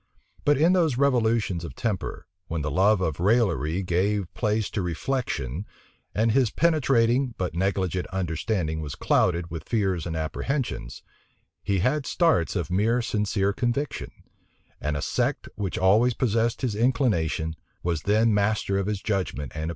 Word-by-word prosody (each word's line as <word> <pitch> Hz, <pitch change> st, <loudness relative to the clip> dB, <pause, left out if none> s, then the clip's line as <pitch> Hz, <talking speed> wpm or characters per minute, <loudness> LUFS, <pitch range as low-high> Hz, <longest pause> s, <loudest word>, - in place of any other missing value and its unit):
But 145 Hz, -1 st, +4 dB
in 165 Hz, +5 st, +4 dB
those 160 Hz, -9 st, +2 dB
revolutions 115 Hz, -9 st, +2 dB
of 85 Hz, -, -7 dB
temper, 105 Hz, -6 st, -3 dB, 0.2 s
when 80 Hz, -2 st, -3 dB
the 75 Hz, -, -2 dB
love 95 Hz, +6 st, +3 dB
of 80 Hz, -4 st, -1 dB
raillery 95 Hz, -4 st, +2 dB
gave 95 Hz, +2 st, 0 dB
place 110 Hz, -2 st, 0 dB
to 105 Hz, -, -1 dB
reflection, 90 Hz, -, -2 dB, 0.5 s
and 110 Hz, +2 st, +3 dB
his 125 Hz, -1 st, +3 dB
penetrating, 130 Hz, -5 st, +2 dB
but 90 Hz, -2 st, -2 dB
negligent 95 Hz, 0 st, -1 dB
understanding 85 Hz, -2 st, -2 dB
was 75 Hz, -2 st, -5 dB
clouded 85 Hz, -1 st, +1 dB
with 80 Hz, -2 st, -7 dB
fears 95 Hz, -7 st, 0 dB
and 80 Hz, -, -3 dB
apprehensions, 80 Hz, -, -3 dB, 0.6 s
he 100 Hz, -2 st, 0 dB
had 135 Hz, +6 st, +1 dB
starts 160 Hz, -, +2 dB
of 90 Hz, -1 st, -2 dB
mere 115 Hz, +6 st, +2 dB
sincere 105 Hz, -3 st, 0 dB
conviction; 125 Hz, +6 st, -2 dB, 0.7 s
and 75 Hz, -1 st, -1 dB
a 70 Hz, -, -3 dB
sect -, -, -1 dB
which 100 Hz, -4 st, -3 dB
always 110 Hz, +6 st, +4 dB
possessed 115 Hz, 0 st, 0 dB
his 120 Hz, -4 st, 0 dB
inclination, 105 Hz, -, +1 dB, 0.3 s
was 85 Hz, -3 st, -1 dB
then 110 Hz, +3 st, +3 dB
master 100 Hz, -1 st, +1 dB
of 100 Hz, -, -2 dB
his 105 Hz, -2 st, -2 dB
judgment 95 Hz, -, -2 dB
and -, -, -16 dB
opinion. 80 Hz, +1 st, -3 dB
100 Hz, 150 wpm, -26 LUFS, 85-120 Hz, 0.7 s, But